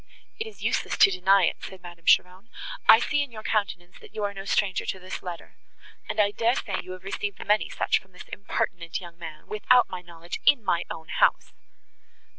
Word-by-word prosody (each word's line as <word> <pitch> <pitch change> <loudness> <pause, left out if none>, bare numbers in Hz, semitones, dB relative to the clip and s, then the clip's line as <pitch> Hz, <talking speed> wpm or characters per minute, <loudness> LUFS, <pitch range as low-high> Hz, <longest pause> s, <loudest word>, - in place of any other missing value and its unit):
"It 445 - -3
is 440 - -11
useless - - -1
to 195 - +7
deny 190 +1 +4
it," - - 0
said 190 -2 -9
Madame 175 -1 -12
Cheron, 185 +5 +3 0.4
"I - - +11
see 290 +4 +1
in 285 -3 -4
your 215 -1 -9
countenance, 195 -5 -2
that - - -16
you 215 - -3
are 200 0 -1
no 195 0 -8
stranger 195 -2 +1
to - - -3
this 185 0 -7
letter; 175 -2 -8 0.5
and, - - -3
I 205 -1 +4
dare 235 +3 +1
say, - - -3
you 185 - -8
have 185 0 -11
received 200 +1 -4
many 210 +1 +2
such - - +1
from 190 - -25
this 180 - -13
impertinent 175 -4 -3
young 175 -1 -12
man, 160 -2 -9
without 245 +4 +3
my 185 -1 -5
knowledge, 170 -1 -8
in 265 -6 +5
my 170 -3 +1
own 160 0 -8
house." - - +2
190 Hz, 210 wpm, -26 LUFS, 175-210 Hz, 0.5 s, I